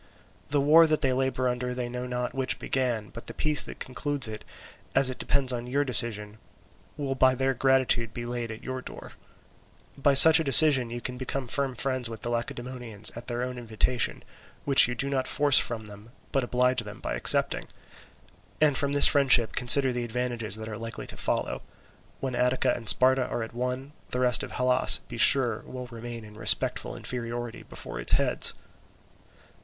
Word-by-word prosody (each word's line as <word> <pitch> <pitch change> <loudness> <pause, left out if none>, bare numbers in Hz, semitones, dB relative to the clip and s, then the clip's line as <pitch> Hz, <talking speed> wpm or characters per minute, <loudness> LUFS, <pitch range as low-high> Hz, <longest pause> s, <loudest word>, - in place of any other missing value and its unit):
The 145 - 0
war 155 +4 +5
that 155 -1 -1
they 130 -1 +1
labour 130 0 -1
under 125 0 -3
they 125 -1 -4
know 125 +1 -6
not 125 0 -4
which 130 -1 -3
began, 120 -5 -2
but 115 - -12
the - - -8
peace 150 -1 +3
that - - -9
concludes 135 0 -2
it, 110 -1 -8 0.5
as 130 -1 +4
it 130 - -10
depends 130 -2 +1
on 120 0 -5
your 140 +3 -1
decision, 110 -5 -1 0.6
will 140 -2 -3
by 130 0 +2
their 135 +1 -1
gratitude 130 -3 +1
be 120 +1 -7
laid 120 -1 -5
to 110 0 -10
your 130 0 -6
door. - - -11 0.8
By 140 0 +1
such 160 +4 +10
a - - -1
decision 135 -3 +3
you 120 +1 -7
can 125 +1 -6
become 130 0 -5
firm 135 +1 -2
friends 130 -3 0
with 115 -1 -9
the 120 - -5
Lacedaemonians 120 -2 -4
at 115 - -10
their 120 0 -3
own 125 -1 -6
invitation, 115 +2 -2 0.4
which 140 -1 +6
you 125 - -5
do 130 +3 -3
not 135 -2 -2
force 145 -2 +5
from 115 -3 -4
them, 105 +1 -14 0.2
but 135 -2 0
oblige 125 0 0
them 105 -2 -11
by - - -5
accepting. - - +2 0.9
And 150 -2 +2
from 140 +1 0
this 145 - +8
friendship 130 -6 +4
consider 130 +1 +4
the 120 0 -3
advantages 120 -3 -3
that 110 0 -8
are 110 0 -7
likely 115 0 -8
to - - -10
follow: - - -3 0.6
when 130 -1 -4
Attica 125 +1 0
and 115 - -9
Sparta 130 +2 +3
are 120 - -4
at 115 - -10
one, 125 +3 -5 0.2
the 125 - -4
rest 125 -1 +2
of - - -7
Hellas, 125 0 +2
be 120 - -9
sure, 120 -4 +5
will 125 -1 -9
remain 115 -1 -9
in 105 0 -15
respectful - - +1
inferiority 120 -1 -6
before - - -9
its - - +1
heads." - - +4
125 Hz, 190 wpm, -26 LUFS, 120-135 Hz, 0.9 s, such